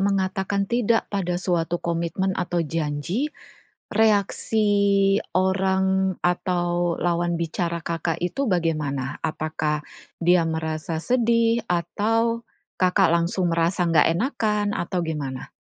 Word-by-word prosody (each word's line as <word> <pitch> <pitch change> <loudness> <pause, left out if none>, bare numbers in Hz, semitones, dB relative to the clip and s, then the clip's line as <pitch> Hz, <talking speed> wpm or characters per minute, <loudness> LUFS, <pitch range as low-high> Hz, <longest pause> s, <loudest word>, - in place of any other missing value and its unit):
mengatakan 195 0 0
tidak 235 +1 +1
pada 180 -3 -1
suatu 175 -2 0
komitmen 170 +3 -1
atau 175 -1 -1
janji, 165 - -2 0.6
reaksi 215 0 +2 0.7
orang 190 0 +2
atau 175 -1 0
lawan 175 0 0
bicara 170 +1 -2
Kakak 165 0 -2
itu 270 +11 -1
bagaimana? 150 - -1
Apakah 155 -1 -2 0.4
dia 175 0 +4
merasa 160 0 -3
sedih? 230 -1 +2
Atau 225 +7 0 0.3
Kakak 185 +1 +3
langsung 170 +1 +1
merasa 170 +2 +1
enggak 160 -3 +4
enakan? 210 -1 0
Atau 180 +1 -2
gimana? 145 -5 -4
175 Hz, 105 wpm, -24 LUFS, 165-200 Hz, 0.7 s, dia